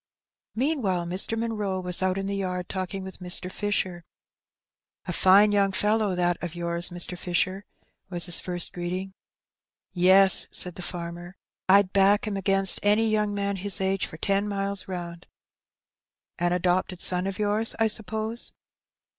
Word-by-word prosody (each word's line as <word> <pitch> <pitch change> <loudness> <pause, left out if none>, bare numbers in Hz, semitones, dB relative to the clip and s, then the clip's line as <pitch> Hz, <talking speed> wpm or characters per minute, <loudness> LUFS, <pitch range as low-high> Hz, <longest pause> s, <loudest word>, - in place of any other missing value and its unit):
Meanwhile 225 - 0
Mr. 185 +6 -1
Munroe 210 -4 -2
was 180 0 -2
out 185 0 0
in 195 - -3
the 200 0 -2
yard 180 -2 -3
talking 190 0 -4
with 190 -1 -9
Mr. 180 0 -2
Fisher. 185 -4 -2 1.0
''A 175 - -2
fine 200 +4 +5
young 200 -1 +2
fellow 210 -1 +1
that 175 -1 0
of 175 -1 -5
yours, 170 0 -1
Mr. 175 0 -3
Fisher/' 185 +3 -2 0.4
was 175 -2 0
his 175 -2 +3
first 175 -1 -5
greeting. 180 +2 -5 0.8
^^Yes/' 190 +2 +5
said 180 - +4
the 180 - -9
farmer; 175 +1 -6 0.3
'^Fd 195 -1 +5
back 200 +1 +4
him 210 -2 -3
against 195 0 +3
any 210 +2 +3
young 210 -1 0
man 200 0 -2
his 200 +1 0
age 190 0 0
for 160 - -11
ten 200 +4 0
miles 200 -1 -3
round." 175 -2 -7 0.6
*' - - -30
An 175 0 +1
adopted 180 0 0
son 180 +1 0
of 195 -1 -4
yours, 210 +2 +1
I 225 - +2
suppose 220 +2 -2
190 Hz, 155 wpm, -26 LUFS, 180-205 Hz, 1.0 s, fine